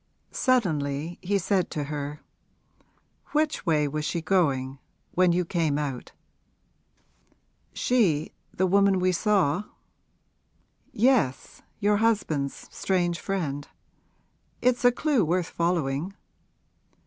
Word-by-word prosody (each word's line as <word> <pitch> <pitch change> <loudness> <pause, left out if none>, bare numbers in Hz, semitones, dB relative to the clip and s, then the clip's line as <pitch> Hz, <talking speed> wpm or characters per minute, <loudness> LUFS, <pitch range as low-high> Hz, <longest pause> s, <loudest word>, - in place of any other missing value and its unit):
Suddenly 160 - 0
he 200 +2 +1
said 190 -1 0
to 150 - -3
her: 145 0 -5 1.1
'Which 305 -8 0
way 150 -2 +3
was 150 +2 -3
she 170 - -1
going, 140 -6 0 0.3
when 180 -1 +3
you 175 +1 +1
came 160 -4 0
out?' 140 -4 -4 1.6
'She 185 -12 +1 0.2
the 185 - 0
woman 195 +1 +4
we 185 0 +2
saw?' 195 -1 +1 1.3
'Yes, 230 - +1 0.2
your 205 0 +3
husband's 195 -11 0
strange 175 -2 0
friend. 150 -8 -3 0.9
It's 250 0 +1
a 245 - +7
clew 270 -2 +1
worth 175 +2 0
following.' 170 0 -1
175 Hz, 100 wpm, -26 LUFS, 150-200 Hz, 1.6 s, a